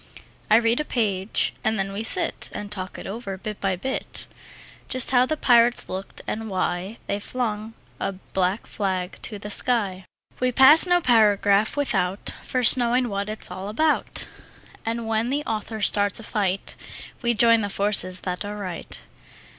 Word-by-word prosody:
I 215 Hz, -, +6 dB
read 230 Hz, +2 st, +3 dB
a -, -, 0 dB
page, 205 Hz, -7 st, 0 dB
and 220 Hz, 0 st, +1 dB
then 195 Hz, 0 st, -2 dB
we 205 Hz, +2 st, -3 dB
sit 225 Hz, -, 0 dB
And 205 Hz, 0 st, -6 dB
talk 185 Hz, -3 st, -5 dB
it -, -, -9 dB
over, 195 Hz, -2 st, -6 dB
bit 210 Hz, +1 st, -7 dB
by 195 Hz, -2 st, 0 dB
bit; 265 Hz, +9 st, -3 dB, 0.6 s
Just 255 Hz, -1 st, +2 dB
how 250 Hz, 0 st, +4 dB
the 310 Hz, -, -1 dB
pirates 240 Hz, -3 st, +4 dB
looked, 190 Hz, +1 st, -6 dB
and 220 Hz, 0 st, -4 dB
why 185 Hz, +2 st, -2 dB
They 200 Hz, -, -2 dB
flung 220 Hz, -1 st, -4 dB, 0.2 s
a 195 Hz, -, -2 dB
black 190 Hz, +1 st, -2 dB
flag 185 Hz, -3 st, -3 dB
to 215 Hz, -, -4 dB
the 205 Hz, +1 st, -7 dB
sky. 200 Hz, -6 st, 0 dB, 0.3 s
We 255 Hz, 0 st, +1 dB
pass 285 Hz, +8 st, +8 dB
no 355 Hz, 0 st, +3 dB
paragraph 210 Hz, -, +3 dB
without 195 Hz, -9 st, 0 dB
First 255 Hz, 0 st, +4 dB
knowing 245 Hz, 0 st, +1 dB
what 200 Hz, 0 st, -3 dB
it's 215 Hz, -, -3 dB
all 195 Hz, +2 st, -6 dB
about, 310 Hz, +8 st, 0 dB, 0.6 s
And 230 Hz, 0 st, -2 dB
when 225 Hz, +1 st, 0 dB
the 285 Hz, +3 st, -1 dB
author 220 Hz, 0 st, -4 dB
starts 205 Hz, 0 st, +3 dB
a -, -, -9 dB
fight 200 Hz, -4 st, -2 dB, 0.5 s
We 235 Hz, -1 st, +1 dB
join 230 Hz, +1 st, +5 dB
the 205 Hz, -, -2 dB
forces 195 Hz, -3 st, +1 dB
that 180 Hz, +1 st, -3 dB
are 205 Hz, +1 st, -6 dB
right. 185 Hz, -4 st, -6 dB
215 Hz, 170 wpm, -24 LUFS, 195-235 Hz, 0.6 s, pass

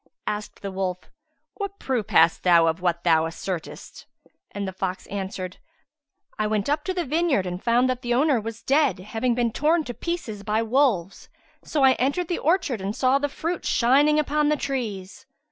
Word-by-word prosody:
Asked 210 Hz, 0 st, -5 dB
the 195 Hz, -, -4 dB
wolf, 185 Hz, -1 st, -4 dB, 0.5 s
"What 400 Hz, -1 st, -5 dB
proof 245 Hz, -6 st, -2 dB
hast 160 Hz, 0 st, +4 dB
thou 170 Hz, -2 st, +5 dB
of 165 Hz, +2 st, 0 dB
what 170 Hz, -1 st, 0 dB
thou 160 Hz, -2 st, +4 dB
assertest?": 170 Hz, +1 st, -6 dB, 0.4 s
and 200 Hz, -1 st, -5 dB
the 190 Hz, -, -5 dB
fox 185 Hz, 0 st, -4 dB
answered, 190 Hz, -2 st, -5 dB, 0.8 s
"I 215 Hz, -, +1 dB
went 210 Hz, -2 st, -1 dB
up 295 Hz, +2 st, 0 dB
to 375 Hz, -, -1 dB
the 355 Hz, -, -1 dB
vineyard 305 Hz, -, +1 dB
and 180 Hz, 0 st, -5 dB
found 240 Hz, +2 st, +3 dB
that 255 Hz, -1 st, -2 dB
the 240 Hz, -2 st, 0 dB
owner 270 Hz, -3 st, +3 dB
was 225 Hz, +1 st, -7 dB
dead, 285 Hz, +1 st, +2 dB
having 225 Hz, +6 st, -2 dB
been 240 Hz, -1 st, +1 dB
torn 310 Hz, +6 st, +2 dB
to 245 Hz, -, -6 dB
pieces 270 Hz, -10 st, -4 dB
by 215 Hz, +2 st, 0 dB
wolves: 225 Hz, -7 st, 0 dB, 0.3 s
so 295 Hz, -3 st, 0 dB
I 265 Hz, -, +7 dB
entered 285 Hz, +7 st, 0 dB
the 350 Hz, -, -1 dB
orchard 300 Hz, -, +1 dB
and 195 Hz, +3 st, -3 dB
saw 260 Hz, +1 st, +3 dB
the 290 Hz, +1 st, -1 dB
fruit 335 Hz, +4 st, -4 dB
shining 280 Hz, +5 st, +3 dB
upon 300 Hz, 0 st, +1 dB
the 300 Hz, -, +2 dB
trees." 250 Hz, -4 st, -5 dB
235 Hz, 185 wpm, -24 LUFS, 190-285 Hz, 0.8 s, I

